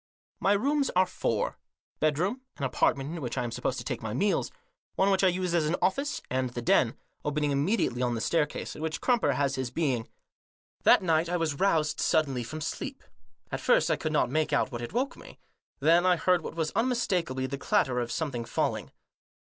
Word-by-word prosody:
My 200 Hz, -, +3 dB
rooms 280 Hz, +7 st, +1 dB
are 185 Hz, +1 st, +5 dB
four: -, -, -2 dB, 0.4 s
bedroom; 175 Hz, -, +1 dB, 0.2 s
an -, -, -6 dB
apartment 135 Hz, +2 st, +1 dB
in 165 Hz, -, -6 dB
which 125 Hz, -, -4 dB
I -, -, 0 dB
am 120 Hz, -, -3 dB
supposed 125 Hz, +2 st, -2 dB
to 120 Hz, -, -5 dB
take -, -, -4 dB
my 110 Hz, 0 st, -4 dB
meals; 200 Hz, +10 st, +1 dB, 0.5 s
one 195 Hz, +1 st, +3 dB
which 195 Hz, 0 st, +2 dB
I -, -, +6 dB
use 180 Hz, -1 st, 0 dB
as 165 Hz, -3 st, +2 dB
an 165 Hz, -, +1 dB
office; 275 Hz, +10 st, 0 dB
and 130 Hz, 0 st, -1 dB
the 120 Hz, 0 st, -5 dB
den, -, -, +3 dB, 0.3 s
opening 150 Hz, 0 st, 0 dB
immediately 140 Hz, -, +1 dB
on 125 Hz, -1 st, +1 dB
to -, -, -1 dB
the 115 Hz, -, -3 dB
staircase, 160 Hz, +1 st, -1 dB
in -, -, -8 dB
which 160 Hz, 0 st, -2 dB
Crumper 245 Hz, -3 st, +2 dB
has 140 Hz, -1 st, +1 dB
his 130 Hz, -2 st, -2 dB
being. 130 Hz, -5 st, -1 dB, 0.7 s
That -, -, +6 dB
night 165 Hz, -1 st, +2 dB
I 175 Hz, -, +1 dB
was 155 Hz, -4 st, -1 dB
roused 155 Hz, -6 st, +2 dB
suddenly 135 Hz, -6 st, +1 dB
from 155 Hz, +7 st, -6 dB
sleep. -, -, -5 dB, 0.5 s
At -, -, -3 dB
first -, -, +3 dB
I -, -, +3 dB
could -, -, -3 dB
not -, -, +1 dB
make 155 Hz, +1 st, +1 dB
out 140 Hz, -2 st, +1 dB
what 120 Hz, -1 st, -5 dB
had 120 Hz, -, -5 dB
woke 260 Hz, +4 st, -1 dB
me. -, -, -13 dB, 0.4 s
Then 165 Hz, +4 st, +5 dB
I 185 Hz, -1 st, +4 dB
heard 180 Hz, +1 st, +2 dB
what 160 Hz, -, -7 dB
was 160 Hz, -2 st, -1 dB
unmistakably 190 Hz, -, 0 dB
the 135 Hz, +1 st, -4 dB
clatter 125 Hz, -2 st, +1 dB
of 120 Hz, -1 st, -3 dB
some 160 Hz, -3 st, -2 dB
thing 120 Hz, -2 st, -3 dB
falling. 115 Hz, -, -1 dB
155 Hz, 210 wpm, -28 LUFS, 130-185 Hz, 0.7 s, I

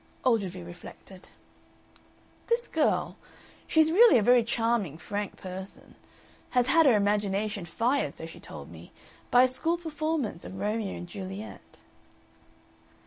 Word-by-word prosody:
Ogilvy 195 Hz, -7 st, +1 dB
reflected. 175 Hz, +2 st, -12 dB, 1.2 s
"This 475 Hz, 0 st, 0 dB
girl 315 Hz, -2 st, 0 dB, 0.5 s
she's 315 Hz, 0 st, +4 dB
really 440 Hz, -, +7 dB
a 220 Hz, -, +2 dB
very 245 Hz, +1 st, +5 dB
charming, 225 Hz, -, -1 dB
frank 205 Hz, +4 st, -4 dB
person 190 Hz, +1 st, -9 dB, 0.6 s
had 250 Hz, -1 st, +2 dB
had 325 Hz, +3 st, +5 dB
her 250 Hz, -, +6 dB
imagination 205 Hz, -1 st, 0 dB
fired, 235 Hz, +11 st, 0 dB
so -, -, -7 dB
she -, -, -11 dB
told -, -, -10 dB
me, -, -, -13 dB, 0.4 s
by 245 Hz, +1 st, +6 dB
a -, -, +5 dB
school 325 Hz, +7 st, -1 dB
performance 310 Hz, -, -3 dB
of 190 Hz, -, -8 dB
Romeo 210 Hz, 0 st, -2 dB
and 175 Hz, -, -8 dB
Juliet." 195 Hz, +2 st, -9 dB
220 Hz, 130 wpm, -28 LUFS, 190-275 Hz, 1.2 s, really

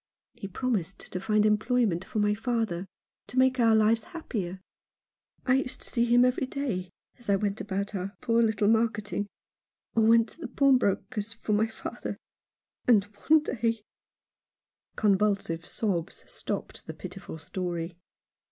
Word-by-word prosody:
He 195 Hz, -, -7 dB
promised 195 Hz, -3 st, -2 dB
to 185 Hz, -, -2 dB
find 215 Hz, +1 st, +2 dB
employment 215 Hz, -3 st, +2 dB
for 205 Hz, -, -6 dB
my 210 Hz, 0 st, +3 dB
father; 220 Hz, -5 st, -1 dB, 0.4 s
to 235 Hz, +5 st, -7 dB
make 260 Hz, 0 st, +4 dB
our 225 Hz, -2 st, +5 dB
lives 220 Hz, +1 st, +3 dB
happier. 200 Hz, -, -4 dB, 0.9 s
I 260 Hz, 0 st, +4 dB
used 265 Hz, -1 st, -3 dB
to -, -, -5 dB
see 235 Hz, -1 st, +2 dB
him 240 Hz, +1 st, +5 dB
every 250 Hz, +1 st, +1 dB
day 240 Hz, -11 st, -3 dB, 0.3 s
as 240 Hz, -, -9 dB
I 200 Hz, -, +5 dB
went 200 Hz, +1 st, -1 dB
about 200 Hz, 0 st, -3 dB
our 195 Hz, +1 st, -4 dB
poor 230 Hz, 0 st, +2 dB
little 215 Hz, -2 st, +2 dB
marketing 215 Hz, -2 st, +1 dB, 0.3 s
— -, -, -66 dB
or 225 Hz, -, +4 dB
went 230 Hz, +1 st, +5 dB
to 335 Hz, -, -15 dB
the -, -, -3 dB
pawnbroker's 230 Hz, -5 st, +2 dB
for 225 Hz, -2 st, -2 dB
my 215 Hz, +2 st, +3 dB
father 220 Hz, -, -6 dB, 0.3 s
— -, -, -46 dB
and 220 Hz, -5 st, +6 dB, 0.3 s
one 310 Hz, -1 st, +7 dB
day 230 Hz, -5 st, -1 dB, 0.6 s
" -, -, -58 dB
Convulsive 200 Hz, -5 st, +1 dB
sobs 185 Hz, -7 st, -2 dB
stopped -, -, -5 dB
the -, -, -6 dB
pitiful -, -, -8 dB
story. 170 Hz, +1 st, -4 dB
215 Hz, 155 wpm, -28 LUFS, 195-235 Hz, 0.9 s, one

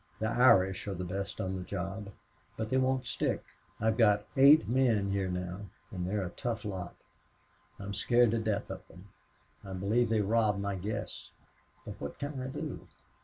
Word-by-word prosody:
The 110 Hz, -, -2 dB
Irish 105 Hz, -7 st, +4 dB
are 100 Hz, -, -2 dB
the 90 Hz, -, -4 dB
best 95 Hz, +3 st, -4 dB
on 95 Hz, 0 st, -2 dB
the 95 Hz, -, -4 dB
job. 95 Hz, +3 st, -5 dB, 0.5 s
But 110 Hz, 0 st, -3 dB
they 130 Hz, -, +3 dB
won't 130 Hz, 0 st, +1 dB
stick. -, -, -1 dB, 0.4 s
I've 110 Hz, +1 st, +1 dB
got 105 Hz, -2 st, +4 dB
eight 140 Hz, -4 st, +7 dB
men 115 Hz, -5 st, +2 dB
here 100 Hz, -1 st, 0 dB
now, 90 Hz, +2 st, -4 dB, 0.2 s
and 90 Hz, -2 st, -3 dB
they 105 Hz, -, -1 dB
are 100 Hz, -3 st, 0 dB
a -, -, -4 dB
tough 115 Hz, 0 st, -4 dB
lot. 95 Hz, -4 st, -5 dB, 0.8 s
I'm 100 Hz, 0 st, -5 dB
scared 120 Hz, +1 st, +3 dB
to 115 Hz, -, +1 dB
death 110 Hz, -2 st, -2 dB
of -, -, -6 dB
them. 95 Hz, +3 st, -15 dB, 0.5 s
I 95 Hz, -, -7 dB
believe 105 Hz, +6 st, +1 dB
they 110 Hz, -1 st, +2 dB
rob 105 Hz, 0 st, +2 dB
my 100 Hz, 0 st, -1 dB
guests. 100 Hz, +3 st, -5 dB, 0.6 s
But -, -, -8 dB
what 70 Hz, -, -5 dB
can 145 Hz, -2 st, -4 dB
I 130 Hz, -, -3 dB
do? 130 Hz, -, -6 dB
105 Hz, 185 wpm, -31 LUFS, 95-115 Hz, 0.8 s, eight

